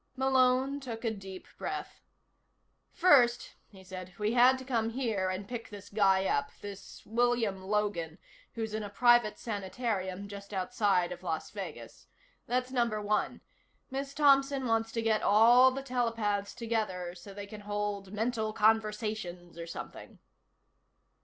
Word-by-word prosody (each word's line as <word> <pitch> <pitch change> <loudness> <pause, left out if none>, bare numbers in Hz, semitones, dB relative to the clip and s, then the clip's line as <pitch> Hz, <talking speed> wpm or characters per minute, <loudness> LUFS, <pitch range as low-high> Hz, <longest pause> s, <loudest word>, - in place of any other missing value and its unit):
Malone 265 +1 +3
took 240 -4 -6
a 225 - +1
deep 195 -3 -9
breath. - - -5 0.9
"First," 250 -9 +4
he 190 -2 -16
said, 185 -1 -9
"we 210 +1 0
had 250 +2 +6
to 260 - -9
come 230 -4 0
here 225 -6 -1
and 185 +2 -4
pick 240 -1 -6
this 205 -1 -10
guy 195 -2 +3
up. 280 +7 0
This 200 -1 -10
William 230 -4 +1
Logan, 190 -5 -1 0.4
who's 220 -2 -3
in 215 - -2
a 205 - -5
private 240 +1 +4
sanitarium 200 -2 -3
just 200 0 -8
outside 190 -3 +1
of 175 0 -7
Las 160 -3 -3
Vegas. - - -8 0.4
That's 250 +1 -1
number 235 -4 +1
one. 210 0 -1 0.5
Miss 275 +1 -4
Thompson 275 -2 +4
wants 225 -1 +1
to 230 - -1
get 220 -1 +2
all 235 +5 +7
the 270 +1 -5
telepaths 225 -6 -1
together, 215 -7 -2
so 180 +3 -12
they 200 +1 -7
can 210 +1 -10
hold 205 -1 -3
mental 220 0 -1
conversations 210 -5 0
or 170 0 -7
something." 165 - -9
215 Hz, 145 wpm, -31 LUFS, 200-245 Hz, 0.9 s, all